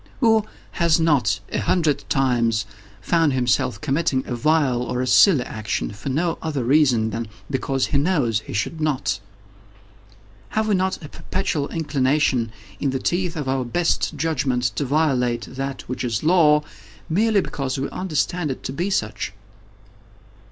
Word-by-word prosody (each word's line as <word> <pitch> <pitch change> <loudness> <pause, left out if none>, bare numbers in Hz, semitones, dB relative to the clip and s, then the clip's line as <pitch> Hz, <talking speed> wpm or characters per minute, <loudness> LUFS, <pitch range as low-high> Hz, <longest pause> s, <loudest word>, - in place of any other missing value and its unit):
Who 225 -3 +4 0.3
has 170 -1 +2
not, 140 -10 +2
a - - 0
hundred 155 -6 0
times, 120 -4 +1 0.4
found 165 -4 +2
himself 125 -3 +1
committing 140 -2 0
a - - -4
vile 135 -1 +2
or 125 0 -2
a 130 - 0
silly 140 +2 +5
action, 105 - -3
for 105 +7 -6
no 165 +5 0
other 150 -5 -2
reason 125 -4 +3
than 115 +1 -4 0.2
because 135 0 0
he 140 - +1
knows 140 - +1
he - - -11
should 155 +10 -2
not? 135 -9 0 1.4
Have 220 0 +2
we 210 - +2
not 190 -1 0
a - - -9
perpetual 160 -7 -2
inclination, 140 -6 +1 0.3
in 140 - 0
the 135 - -1
teeth 175 +5 -1
of 150 -4 -4
our 130 0 0
best 165 +5 0
judgment, 140 -5 0
to 145 - 0
violate 130 -5 +1
that 135 +1 -5
which 125 0 -4
is 120 0 -1
Law, 155 -3 +5 0.4
merely 210 +5 +2
because 135 -6 -3
we 135 +1 -1
understand 175 -1 -1
it 130 - -5
to 130 - -4
be 175 +7 -1
such? 200 - -2
140 Hz, 155 wpm, -22 LUFS, 125-165 Hz, 1.4 s, silly